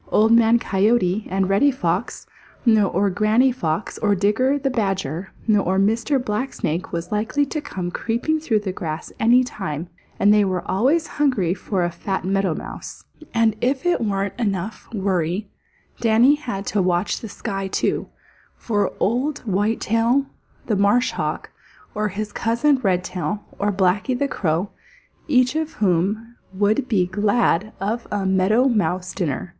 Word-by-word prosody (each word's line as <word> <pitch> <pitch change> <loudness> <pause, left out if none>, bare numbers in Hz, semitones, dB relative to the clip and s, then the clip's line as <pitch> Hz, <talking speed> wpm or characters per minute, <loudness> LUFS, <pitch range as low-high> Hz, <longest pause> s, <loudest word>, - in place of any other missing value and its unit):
Old 220 +2 +3
Man 230 0 +6
Coyote 205 -2 +1
or 195 +1 0
Reddy 200 +9 +3
Fox 190 -5 -2 0.4
or 205 -3 +3
Granny 215 +7 +3
Fox 170 -7 -3
or 205 -2 +2
Digger 220 +8 +2
the 270 -1 -1
Badger 195 - -2 0.2
or 200 -3 +2
Mr. 225 +8 +2
Blacksnake 210 - -3
was 170 +3 -4
likely 225 +7 0
to 300 +2 -4
come 180 -10 -5
creeping 240 - -1
through 225 -9 0
the 195 -2 -3
grass 160 -3 -5
any 240 +3 +5
time, 175 - -5 0.3
and 205 +1 +5
they 210 - +5
are 185 -2 -1
always 265 - +2
hungry 250 - +1
for 190 0 -2
a 175 - -1
fat 190 +2 -4
Meadow 195 -3 +1
Mouse. - - -8 0.3
And 230 -2 +3
as 215 - -22
if 265 +2 0
that 350 -9 +1
weren't 200 0 -2
worry - - 0
enough, 195 -2 -2 0.5
Danny 235 +4 +5
had 240 -10 -4
to 205 - 0
watch 180 +1 0
the 225 - -8
sky, 195 -1 -4
too, - - -1 0.5
for 205 -4 -1
Old 255 +7 0
Whitetail 225 +5 +1 0.4
the 215 - 0
Marsh 205 +6 +3
Hawk, - - -4 0.4
or 210 0 -1
his 210 +1 -4
cousin 240 +7 +1
Redtail, 185 0 -1 0.2
or 205 +1 +1
Blacky 195 +6 +1
the 280 - 0
Crow, 175 - -1 0.6
each 255 -2 +3
of 315 0 -2
whom 210 +5 0 0.2
would 210 +7 +1
be 195 -6 +2
glad 205 +1 +1
of 215 +5 -2
a 205 -2 -1
Meadow 190 +7 +3
Mouse 185 -6 0
dinner. 170 -2 -3
210 Hz, 150 wpm, -22 LUFS, 190-235 Hz, 0.6 s, Man